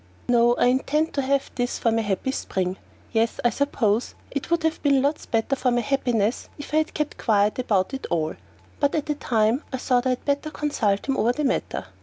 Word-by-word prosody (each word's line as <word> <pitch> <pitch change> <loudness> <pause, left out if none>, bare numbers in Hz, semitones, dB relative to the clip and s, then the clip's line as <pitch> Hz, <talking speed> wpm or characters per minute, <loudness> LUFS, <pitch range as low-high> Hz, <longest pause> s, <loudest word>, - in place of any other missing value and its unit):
No, 240 0 +4
I - - +2
intend 280 +5 +1
to 280 - 0
have 275 +1 0
this 245 0 -1
for 230 - +1
my 225 0 +1
happy 205 +5 -1
spring. 185 -7 -2 0.3
Yes, 225 0 +1
I 240 - +5
suppose 235 -5 0 0.2
it 280 - -4
would 340 -1 +1
have 320 0 0
been 275 -2 +3
lots 290 +2 -1
better 225 +4 +1
for 260 - +1
my 240 0 +2
happiness 240 -5 0
if 290 0 -9
I - - +4
had 315 0 0
kept 300 -1 -2
quiet 210 0 +2
about 210 -3 +1
it 270 - -4
all, 160 -2 0 0.5
but 285 -1 +2
at 305 - 0
the 300 - 0
time 230 -2 +1
I 260 - -2
thought 250 0 +1
I 255 -1 +1
had - - -29
better 285 +2 0
consult 230 -10 -1
him 270 -1 0
over 235 +3 +2
the 300 - -2
matter. 270 - -1
255 Hz, 220 wpm, -24 LUFS, 225-280 Hz, 0.5 s, I